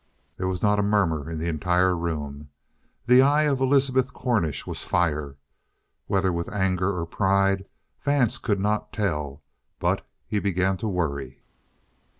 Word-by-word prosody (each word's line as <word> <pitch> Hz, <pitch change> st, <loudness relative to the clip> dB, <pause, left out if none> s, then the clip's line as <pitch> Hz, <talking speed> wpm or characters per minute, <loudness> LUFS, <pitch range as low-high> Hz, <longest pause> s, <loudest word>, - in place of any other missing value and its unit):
There 95 Hz, -, -2 dB
was 95 Hz, +1 st, -3 dB
not 105 Hz, -1 st, +3 dB
a -, -, +4 dB
murmur 90 Hz, -7 st, +1 dB
in 80 Hz, -, -4 dB
the 80 Hz, +2 st, -3 dB
entire 90 Hz, +3 st, +2 dB
room. 75 Hz, -4 st, -4 dB, 0.6 s
The 125 Hz, +2 st, +7 dB
eye 145 Hz, +3 st, +4 dB
of 140 Hz, -3 st, +1 dB
Elizabeth 130 Hz, -1 st, +2 dB
Cornish 85 Hz, -, -1 dB
was -, -, -4 dB
fire. 75 Hz, -5 st, 0 dB, 0.7 s
Whether 95 Hz, -2 st, +1 dB
with 85 Hz, 0 st, -3 dB
anger 95 Hz, -1 st, 0 dB
or 85 Hz, -, -2 dB
pride, 95 Hz, +2 st, +1 dB, 0.4 s
Vance 140 Hz, -5 st, +2 dB
could 105 Hz, -4 st, 0 dB
not 105 Hz, +2 st, -1 dB
tell. 75 Hz, -8 st, -2 dB, 0.3 s
But -, -, 0 dB, 0.2 s
he 105 Hz, -, -1 dB
began 95 Hz, -1 st, 0 dB
to 110 Hz, -, -3 dB
worry. 70 Hz, -8 st, -3 dB
95 Hz, 150 wpm, -25 LUFS, 80-105 Hz, 0.7 s, The